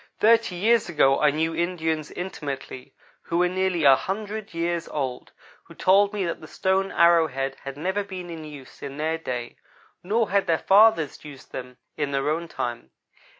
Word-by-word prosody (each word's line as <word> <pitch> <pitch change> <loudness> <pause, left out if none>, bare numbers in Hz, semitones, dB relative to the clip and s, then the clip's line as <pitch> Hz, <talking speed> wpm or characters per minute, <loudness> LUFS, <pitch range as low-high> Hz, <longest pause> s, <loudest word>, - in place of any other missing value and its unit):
Thirty 225 -3 +4
years 220 +3 +2
ago 135 -4 +3
I 150 - +5
knew 160 +3 0
Indians, 160 -3 -1
intimately, 140 -7 -6 0.3
who 170 - -3
were 180 +1 +3
nearly 185 -2 0
a 135 -2 +8
hundred 210 +5 -5
years 170 0 -2
old, 130 -4 -4 0.3
who - - -15
told 200 +2 +4
me 205 -3 -2
that 170 - -4
the 155 - -10
stone 190 +3 0
arrow 170 -1 +5
head 135 -1 -4
had 140 0 -6
never 190 +6 -1
been 185 -3 -8
in 160 -1 -7
use 145 -4 -12
in 140 0 -7
their 160 +2 -1
day, 125 -6 -5 0.4
nor 215 +3 0
had 200 -1 +2
their 165 -1 +3
fathers 200 -6 +4
used 145 -3 -12
them 125 -1 -8 0.2
in 145 -2 -1
their 140 +1 0
own 165 +2 -2
time. 120 - -5
165 Hz, 180 wpm, -25 LUFS, 145-190 Hz, 0.4 s, a